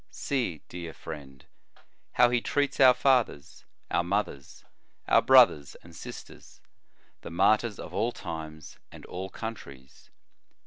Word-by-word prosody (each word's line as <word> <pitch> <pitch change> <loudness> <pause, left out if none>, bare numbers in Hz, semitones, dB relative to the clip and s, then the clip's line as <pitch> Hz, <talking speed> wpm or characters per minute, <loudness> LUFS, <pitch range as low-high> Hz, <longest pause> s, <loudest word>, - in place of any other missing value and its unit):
See, 120 - -3
dear 85 -2 -8
friend, 70 -4 -10 0.7
how 120 -1 +5
he 120 -1 +1
treats 145 +3 -1
our 130 -2 +7
fathers, 125 - 0 0.3
our 85 - +2
mothers, 90 -7 -4 0.4
our - - +5
brothers, 70 -2 +5
and 85 -1 -15
sisters, - - -11 0.6
the - - -8
martyrs 105 +5 +2
of 90 - -9
all 110 +6 0
times 80 -5 -8
and - - -12
all 95 +2 -6
countries. 70 - -9
90 Hz, 125 wpm, -28 LUFS, 80-120 Hz, 0.7 s, our